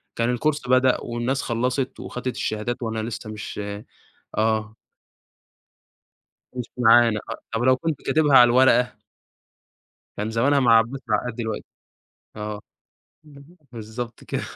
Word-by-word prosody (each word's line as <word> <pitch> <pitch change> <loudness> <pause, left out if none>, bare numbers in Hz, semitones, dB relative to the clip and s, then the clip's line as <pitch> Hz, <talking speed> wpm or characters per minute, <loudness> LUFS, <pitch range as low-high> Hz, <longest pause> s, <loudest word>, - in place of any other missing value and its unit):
كان 115 +1 0
الكورس 145 +5 -1
بدأ 130 0 +3
والناس 120 +4 -2
خلّصت، 125 +3 -2
وخَدِت 125 0 -5
الشهادات 110 +3 -2
وأنا 110 -1 -2
لسّه 110 -1 -6
مش 105 0 -7 0.8
آه. 110 0 0 1.8
مش 125 -2 -6
معانا 115 -2 +5
أ - - -2 0.2
طب 115 - -1
ولو 130 +1 +4
كنت 155 +1 -3
كاتبها 150 -3 +4
على 125 - +9
الورقة؟ 125 0 +4 1.2
كان 105 +2 -3
زمانها 135 +6 +2
مع 115 -3 +6
عباس 120 +5 -1
العقاد 125 -2 0
دلوقتي، 110 -2 -4 0.7
آه، 105 0 -5 0.7
اهم، 145 +4 -16 0.2
بالضبط 115 +1 -7
كده، - - -3
120 Hz, 125 wpm, -23 LUFS, 110-130 Hz, 1.8 s, على